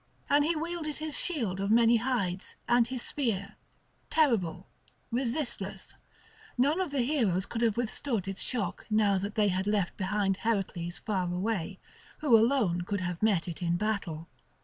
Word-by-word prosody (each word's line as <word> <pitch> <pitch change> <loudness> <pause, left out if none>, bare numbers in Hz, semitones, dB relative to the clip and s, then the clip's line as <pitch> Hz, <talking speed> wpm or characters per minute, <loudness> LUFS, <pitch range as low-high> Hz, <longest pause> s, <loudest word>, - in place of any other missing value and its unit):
And 290 +1 +5
he 330 +3 +1
wielded 320 -1 -3
his 310 -1 -3
shield 230 - -1
of 200 +1 -1
many 230 +1 +5
hides, 220 -7 -2
and 240 -1 +4
his 255 -1 -4
spear, 215 -7 -2 0.5
terrible, 195 - +1 0.4
resistless; 250 +3 -2 0.6
none 290 +8 +3
of 365 - -1
the 275 -3 0
heroes 225 - +1
could 230 - -4
have 230 -2 +2
withstood 235 -3 -2
its 195 -1 -4
shock 235 -6 -2
now 210 -3 +3
that 200 +2 -4
they 210 -2 +3
had 190 +1 -1
left 205 -4 0
behind 195 0 0
Heracles 185 -6 -2
far 185 -5 -2
away, 190 0 -2 0.4
who 290 -6 +4
alone 225 -6 +3
could 200 +2 -2
have 175 -1 -3
met 205 -6 +2
it 170 0 -6
in 170 0 +1
battle. 185 -6 -2
215 Hz, 160 wpm, -30 LUFS, 190-250 Hz, 0.6 s, And